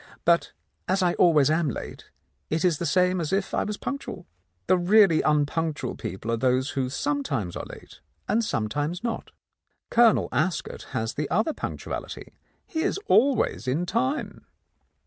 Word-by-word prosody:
But 170 Hz, 0 st, +3 dB, 0.4 s
as 190 Hz, +1 st, +1 dB
I 175 Hz, -1 st, +3 dB
always 155 Hz, -5 st, +4 dB
am 160 Hz, -1 st, +2 dB
late, -, -, -7 dB, 0.4 s
it 160 Hz, +3 st, 0 dB
is 170 Hz, -5 st, +2 dB
the 170 Hz, -, -1 dB
same 180 Hz, -1 st, +2 dB
as 155 Hz, -, -3 dB
if 195 Hz, 0 st, -1 dB
I -, -, +1 dB
was 210 Hz, -1 st, -4 dB
punctual. 280 Hz, -, -5 dB, 0.4 s
The -, -, +4 dB
really 185 Hz, -1 st, +5 dB
un 150 Hz, -1 st, +3 dB
punctual 160 Hz, +1 st, -2 dB
people 95 Hz, +6 st, -5 dB
are 115 Hz, -, +1 dB
those 130 Hz, +3 st, +1 dB
who 130 Hz, -2 st, -1 dB
sometimes 140 Hz, -, -2 dB
are -, -, -5 dB
late -, -, -13 dB, 0.3 s
and 230 Hz, -, +2 dB
sometimes 145 Hz, -, -2 dB
not. 230 Hz, -1 st, -3 dB, 0.6 s
Colonel 235 Hz, -2 st, +5 dB
Ascot 180 Hz, -3 st, -2 dB
has 110 Hz, +1 st, -2 dB
the 150 Hz, 0 st, -3 dB
other 220 Hz, -, +1 dB
punc -, -, -5 dB
tuality; -, -, -6 dB, 0.3 s
he 320 Hz, -, -3 dB
is 380 Hz, -, 0 dB
always 265 Hz, -, +2 dB
in 150 Hz, +8 st, 0 dB
time." 260 Hz, -, -2 dB
170 Hz, 165 wpm, -26 LUFS, 145-205 Hz, 0.6 s, really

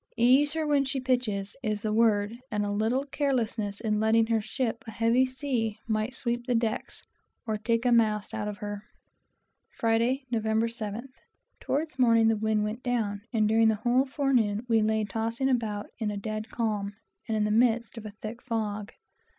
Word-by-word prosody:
"Ease 260 Hz, +5 st, +4 dB
her 320 Hz, -1 st, -1 dB
when 290 Hz, -2 st, +3 dB
she 270 Hz, 0 st, -2 dB
pitches," 245 Hz, -6 st, -1 dB
is 210 Hz, -2 st, -2 dB
the 215 Hz, -1 st, 0 dB
word; 215 Hz, -2 st, +3 dB, 0.2 s
and 210 Hz, -1 st, -1 dB
a 205 Hz, -, -2 dB
little 225 Hz, +6 st, 0 dB
carelessness 235 Hz, -8 st, -1 dB
in 215 Hz, -1 st, 0 dB
letting 220 Hz, +1 st, +4 dB
her 225 Hz, -1 st, +1 dB
ship 230 Hz, +2 st, -2 dB
a -, -, -5 dB
heavy 230 Hz, +4 st, +3 dB
sea, 255 Hz, -5 st, -2 dB
might 220 Hz, +3 st, -1 dB
sweep 240 Hz, -1 st, -2 dB
the 245 Hz, -, +2 dB
decks, 225 Hz, -1 st, -2 dB, 0.4 s
or 215 Hz, -2 st, -2 dB
knock 235 Hz, +1 st, +3 dB
masts 215 Hz, -2 st, +2 dB
out 215 Hz, -2 st, -3 dB
of 210 Hz, -1 st, -4 dB
her. 205 Hz, -1 st, -5 dB, 0.9 s
Friday, 235 Hz, +4 st, +1 dB
Nov. 230 Hz, -2 st, +1 dB
7th. 220 Hz, +2 st, -2 dB, 0.5 s
Towards 295 Hz, -2 st, -2 dB
morning 230 Hz, -2 st, +5 dB
the 225 Hz, -, +3 dB
wind 215 Hz, 0 st, +1 dB
went 215 Hz, +3 st, -3 dB
down, 220 Hz, -5 st, -1 dB
and 220 Hz, -3 st, +2 dB
during 225 Hz, +1 st, +4 dB
the 220 Hz, -, +3 dB
whole 245 Hz, +5 st, +2 dB
forenoon 245 Hz, -6 st, +1 dB
we 225 Hz, -2 st, +3 dB
lay 220 Hz, 0 st, +1 dB
tossing 225 Hz, +5 st, -1 dB
about 220 Hz, -5 st, -1 dB
in 220 Hz, -3 st, -1 dB
a 205 Hz, -, -3 dB
dead 215 Hz, +2 st, -4 dB
calm, 210 Hz, -3 st, -2 dB, 0.3 s
and 220 Hz, -1 st, 0 dB
in 210 Hz, -, +2 dB
the 210 Hz, -, 0 dB
midst 230 Hz, +1 st, +2 dB
of 225 Hz, -2 st, -8 dB
a 205 Hz, -, -11 dB
thick 225 Hz, +3 st, -6 dB
fog. 215 Hz, -4 st, -3 dB
225 Hz, 185 wpm, -28 LUFS, 215-245 Hz, 0.9 s, morning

